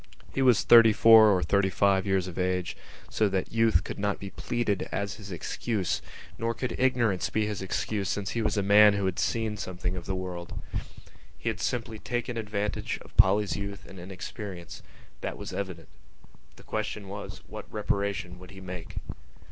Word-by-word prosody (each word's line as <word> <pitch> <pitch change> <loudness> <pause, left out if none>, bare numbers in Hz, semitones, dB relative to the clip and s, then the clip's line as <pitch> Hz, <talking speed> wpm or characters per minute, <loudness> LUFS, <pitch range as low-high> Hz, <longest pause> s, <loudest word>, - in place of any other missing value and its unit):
He 135 - 0
was 125 -5 +5
thirty 115 -2 +8
four 110 0 +8
or 95 -3 +3
thirty 95 +4 +2
five 100 0 +2
years 95 -2 +2
of 90 0 -6
age, 90 -1 -1 0.3
so 110 -2 +1
that 95 -1 -2
youth 115 -6 +3
could - - -6
not 100 0 0
be 100 -1 -8
pleaded 120 -5 -2
as 100 0 -3
his 100 -3 -10
excuse; 90 0 -2 0.4
nor 115 0 -1
could 125 +2 -3
ignorance 120 -7 +2
be 110 0 0
his 105 -2 -3
excuse 100 +1 -2
since 100 -1 -2
he 115 - -1
was 105 -1 0
a 100 - +2
man 105 +1 +7
who 100 -1 -1
had 95 -1 -1
seen 110 -2 0
something 90 -2 -4
of 90 - -7
the 95 - -1
world. 90 -2 -5 0.8
He - - -2
had - - -3
simply 115 -3 -2
taken 120 +1 -3
advantage 105 -2 -2
of - - -18
Polly's 100 +1 +4
youth 100 0 -6
and 95 - -11
inexperience: 95 0 -7 0.4
that - - -4
was - - -7
evident. 95 -7 -5 0.7
The - - -16
question 100 -2 -4
was: 100 +1 -7
What - - -9
reparation 100 -3 -2
would 90 -1 -12
he 95 - -11
make? 90 -3 -8
100 Hz, 180 wpm, -28 LUFS, 95-110 Hz, 0.8 s, thirty